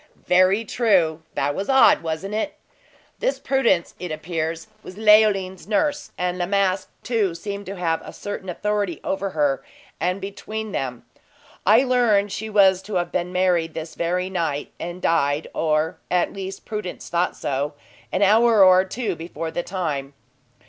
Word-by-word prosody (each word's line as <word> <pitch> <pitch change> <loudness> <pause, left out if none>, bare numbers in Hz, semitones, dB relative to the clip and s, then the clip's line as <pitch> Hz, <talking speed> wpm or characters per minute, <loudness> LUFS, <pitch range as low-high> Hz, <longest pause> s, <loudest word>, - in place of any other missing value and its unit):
"Very 185 +5 +4
true! 185 -9 +2
That 145 +1 0
was 195 - -4
odd 265 0 +6
wasn't 165 +5 -4
it? 220 +8 -2 0.6
This - - 0
Prudence, 235 -11 +1
it 180 -2 -5
appears, 165 +1 -3 0.2
was 185 - -11
Leoline's 210 -4 +4
nurse, 290 +7 0
and 180 0 -1
La 175 - 0
Masque, 195 -1 +1
too, 215 -7 0
seemed 200 +3 -6
to 195 - -5
have 165 -3 -1
a - - -9
certain 205 -2 -6
authority 205 -2 -1
over 195 +1 -2
her; 145 -5 0 0.4
and 180 +3 0
between 215 +2 -6
them, 125 -7 -4 0.6
I 220 +5 +6
learned 230 -6 +2
she 220 +2 -4
was 195 -3 +4
to 205 +1 -6
have 175 -1 0
been 180 0 -2
married 180 -3 +1
this 160 0 -6
very 180 +2 -1
night, 165 -6 -2
and 175 +2 -6
died 145 -2 +1
or, 155 0 0
at 180 -1 +1
least, 195 -1 -7
Prudence 210 -4 -5
thought 175 +1 0
so 145 +1 -2 0.4
an 190 - +1
hour 220 +1 +6
or 185 0 +6
two 200 0 -3
before 165 0 -6
the 175 - -2
time." 150 -8 -4
185 Hz, 160 wpm, -23 LUFS, 165-205 Hz, 0.6 s, odd